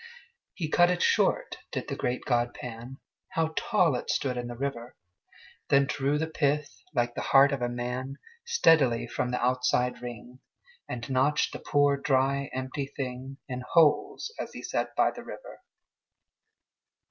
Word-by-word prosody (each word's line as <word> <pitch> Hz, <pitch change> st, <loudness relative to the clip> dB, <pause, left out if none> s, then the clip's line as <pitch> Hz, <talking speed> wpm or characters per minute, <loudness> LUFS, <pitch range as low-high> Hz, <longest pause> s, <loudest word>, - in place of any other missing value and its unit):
He 165 Hz, -, -2 dB
cut 175 Hz, +3 st, +4 dB
it 180 Hz, -1 st, +1 dB
short, -, -, +2 dB
did -, -, -4 dB
the -, -, -3 dB
great 125 Hz, +1 st, -2 dB
god 120 Hz, -1 st, +1 dB
Pan, 120 Hz, +2 st, -8 dB, 0.4 s
(How 160 Hz, -1 st, 0 dB
tall 180 Hz, -, +2 dB
it 125 Hz, -, -4 dB
stood 130 Hz, -2 st, 0 dB
in 120 Hz, -1 st, -3 dB
the 120 Hz, 0 st, -7 dB
river!) 125 Hz, -2 st, -4 dB, 0.7 s
Then 140 Hz, 0 st, +5 dB
drew 140 Hz, +2 st, 0 dB
the 160 Hz, -, 0 dB
pith, 145 Hz, -7 st, -1 dB
like 120 Hz, 0 st, +1 dB
the -, -, -4 dB
heart 135 Hz, +1 st, +5 dB
of 140 Hz, -3 st, -2 dB
a 120 Hz, -, 0 dB
man, 125 Hz, +3 st, -4 dB, 0.3 s
Steadily 160 Hz, -, +4 dB
from 125 Hz, -, -2 dB
the 125 Hz, -, -1 dB
outside 125 Hz, 0 st, +1 dB
ring, 120 Hz, +1 st, -8 dB, 0.5 s
And 120 Hz, -1 st, -5 dB
notched 135 Hz, +3 st, +1 dB
the -, -, -6 dB
poor 145 Hz, -1 st, +2 dB
dry 140 Hz, 0 st, +1 dB
empty 130 Hz, +2 st, -4 dB
thing 135 Hz, 0 st, -6 dB
In 125 Hz, -2 st, -4 dB
holes, 390 Hz, -, +3 dB
as -, -, -5 dB
he -, -, -8 dB
sat -, -, -2 dB
by -, -, +3 dB
the -, -, -10 dB
river. -, -, -10 dB
135 Hz, 160 wpm, -28 LUFS, 125-145 Hz, 0.7 s, Then